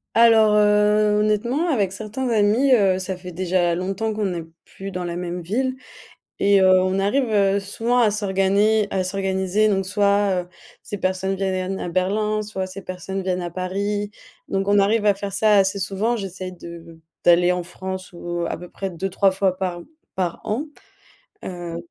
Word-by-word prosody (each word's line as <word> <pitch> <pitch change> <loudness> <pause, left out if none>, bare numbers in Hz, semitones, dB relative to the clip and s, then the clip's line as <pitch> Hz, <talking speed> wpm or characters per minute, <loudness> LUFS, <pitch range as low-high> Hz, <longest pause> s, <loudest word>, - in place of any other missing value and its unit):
Alors, 225 -2 +6
heu, 210 0 +3
honnêtement 235 +10 0
avec 200 - +1
certains 220 +5 -4
amis, 230 +4 +3
heu, 190 -4 +2
ça 190 0 -4
fait 180 0 -9
déjà 175 -1 0
longtemps 195 +5 -2
qu'on 205 -4 -1
est 170 -1 -4 0.2
plus 195 +1 -8
dans 180 -1 -4
la 170 0 -4
même 175 0 -4
ville 255 +9 -2 0.6
et, 200 0 +4
heu, 185 -1 +6
on 185 +1 0
arrive, 250 +7 +1
heu, 200 -1 +2
souvent 230 +5 0
à 225 -3 +4
s'organiser 205 +1 +2
à 190 -1 -1
s'organiser 190 +2 0
donc 195 -2 0
soit, 200 -1 +2
heu, 175 - -16 0.3
ces 205 - -6
personnes 190 +1 -1
vienn 190 0 -1
viennent 185 +1 -2
à - - -4
Berlin, 210 +4 0
soit 195 -3 -4
ces 190 +1 -9
personnes 185 +1 -5
viennent 185 -1 -1
à 175 - -4
Paris, 200 +3 -2 0.4
donc 195 0 -1
on 205 0 +4
arrive 210 +2 +2
à 205 - +5
faire 200 0 -6
ça 210 +2 +3
assez 195 0 +2
souvent, 200 +5 -1
j'essaie 185 -3 -6
de 170 -2 -11 0.3
d'aller 175 +1 +5
en 180 -1 -2
France, 190 +1 -7
ou 175 0 -4
à - - -3
peu 180 0 -10
près 195 -1 -5
2-3 195 +2 +1
fois 190 -1 0
par 180 -2 -3 0.3
par 180 -3 -2
an. 235 +8 -2 0.8
Heu, 175 -2 -6
195 Hz, 180 wpm, -22 LUFS, 185-210 Hz, 0.8 s, Alors